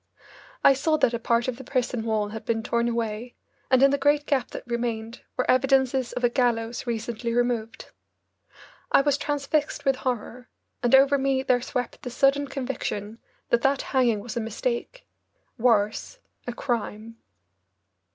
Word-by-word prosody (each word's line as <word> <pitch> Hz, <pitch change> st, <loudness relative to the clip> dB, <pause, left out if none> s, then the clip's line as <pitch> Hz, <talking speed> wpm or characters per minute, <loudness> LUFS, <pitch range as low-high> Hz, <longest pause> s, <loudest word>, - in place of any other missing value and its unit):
I 275 Hz, -, +8 dB
saw 310 Hz, +4 st, +1 dB
that 245 Hz, -, +2 dB
a 235 Hz, -, -1 dB
part 235 Hz, +1 st, +1 dB
of 250 Hz, -2 st, -2 dB
the 265 Hz, -, -9 dB
prison 250 Hz, -3 st, -1 dB
wall 215 Hz, -2 st, 0 dB
had 220 Hz, +1 st, -7 dB
been 225 Hz, -1 st, -1 dB
torn 235 Hz, 0 st, 0 dB
away, 230 Hz, 0 st, -3 dB, 0.3 s
and 260 Hz, 0 st, +5 dB
in 275 Hz, -, +6 dB
the 280 Hz, -, +1 dB
great 290 Hz, +1 st, +3 dB
gap 270 Hz, -4 st, 0 dB
that -, -, -7 dB
remained 235 Hz, -1 st, -3 dB, 0.2 s
were 255 Hz, -, +1 dB
evidences 265 Hz, -1 st, +2 dB
of 250 Hz, -, -4 dB
a -, -, +6 dB
gallows 240 Hz, -1 st, 0 dB
recently 235 Hz, 0 st, -3 dB
removed. 240 Hz, -2 st, -1 dB, 1.0 s
I -, -, +6 dB
was 285 Hz, 0 st, +2 dB
transfixed 290 Hz, 0 st, -1 dB
with 270 Hz, -1 st, +2 dB
horror, 250 Hz, -1 st, -4 dB, 0.3 s
and 245 Hz, +1 st, +5 dB
over 275 Hz, +1 st, +5 dB
me 265 Hz, -1 st, +1 dB
there 250 Hz, -2 st, +2 dB
swept 250 Hz, 0 st, -4 dB
the 250 Hz, -, -5 dB
sudden 275 Hz, +3 st, +2 dB
conviction 235 Hz, -5 st, -4 dB, 0.3 s
that 235 Hz, -, +3 dB
that 270 Hz, +1 st, +2 dB
hanging 240 Hz, -5 st, +3 dB
was 235 Hz, +1 st, -7 dB
a -, -, 0 dB
mistake 475 Hz, -, -3 dB, 0.5 s
worse, 225 Hz, -, +1 dB, 0.3 s
a -, -, -1 dB
crime. 230 Hz, -3 st, -4 dB
245 Hz, 160 wpm, -25 LUFS, 230-270 Hz, 1.0 s, I